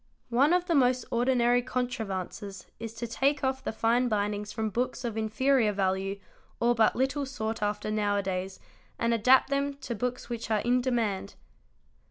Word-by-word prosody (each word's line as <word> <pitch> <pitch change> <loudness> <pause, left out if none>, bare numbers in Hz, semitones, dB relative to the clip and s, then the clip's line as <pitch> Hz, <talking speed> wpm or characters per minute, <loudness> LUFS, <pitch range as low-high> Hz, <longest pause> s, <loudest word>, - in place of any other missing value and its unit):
One 270 +6 +4
of 355 0 +3
the 345 - 0
most 255 -4 +3
ordinary 245 0 +3
contrivances 205 -6 -4
is 225 0 -6
to 235 - -4
take 275 +5 0
off 265 0 -1
the - - -2
fine 230 +3 +2
bindings 210 -1 -1
from 220 -1 -2
books 250 +4 -2
of 230 -2 -3
inferior 225 +2 +2
value 195 0 -1 0.4
or 240 +1 +3
but 225 -2 +3
little 270 +3 0
sought 225 -5 -4
after 210 0 -1
now 205 -1 +1
a 200 - 0
days 190 0 -3 0.4
and 235 0 +1
adapt 255 +5 +4
them 280 0 0
to 265 -3 -5
books 250 +3 -3
which 235 -1 -5
are 215 -2 +2
in 245 +2 +2
demand. 225 -6 -1
235 Hz, 175 wpm, -28 LUFS, 210-255 Hz, 0.4 s, One